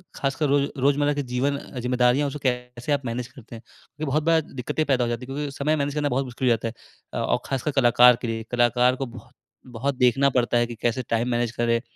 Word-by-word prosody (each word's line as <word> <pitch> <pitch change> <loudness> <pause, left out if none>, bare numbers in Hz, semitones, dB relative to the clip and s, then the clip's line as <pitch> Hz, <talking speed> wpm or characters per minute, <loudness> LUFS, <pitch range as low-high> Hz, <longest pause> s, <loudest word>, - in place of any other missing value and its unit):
ख़ासकर 140 +2 -1
रोज़ 140 0 +3 0.2
रोज़मर्रा 145 +2 +2
के 145 0 -2
जीवन 130 +3 -1
अ, 135 - -8
जिम्मेदारियाँ 125 +3 +2
उसे 140 +1 -5
कैसे 125 +1 -2
आप 140 -2 0
मैनेज 120 0 -3
करते 125 -2 -13
हैं? 115 - -10
क्योंकि 150 +5 -10
बहुत 155 +2 +1
बार 165 0 +3
दिक्कतें 145 +2 -3
पैदा 130 -4 +2
हो 120 - -1
जाती 120 +1 -4
है - - -4
क्योंकि 145 0 -3
समय 150 +2 +1
मैनेज 145 -1 -2
करना 150 -1 0
बहुत 135 +1 0
मुश्किल 125 +1 -3
हो 115 - +4
जाता 115 - -4
है 115 0 -9
और - - +1
ख़ासकर 135 +3 -2
कलाकार 125 -2 +6
के 120 - -3
लिए 115 0 -3
कलाकार 125 +1 +3
को 135 - -3
बहुत 120 -1 -13 0.4
बहुत 135 +4 -1
देखना 125 +2 +3
पड़ता 125 -2 +1
है 120 0 +2
कि 120 - -7
कैसे 120 +2 0
टाइम 115 +2 0
मैनेज 120 -1 0
करें। 115 -1 0
125 Hz, 235 wpm, -24 LUFS, 120-140 Hz, 0.4 s, कलाकार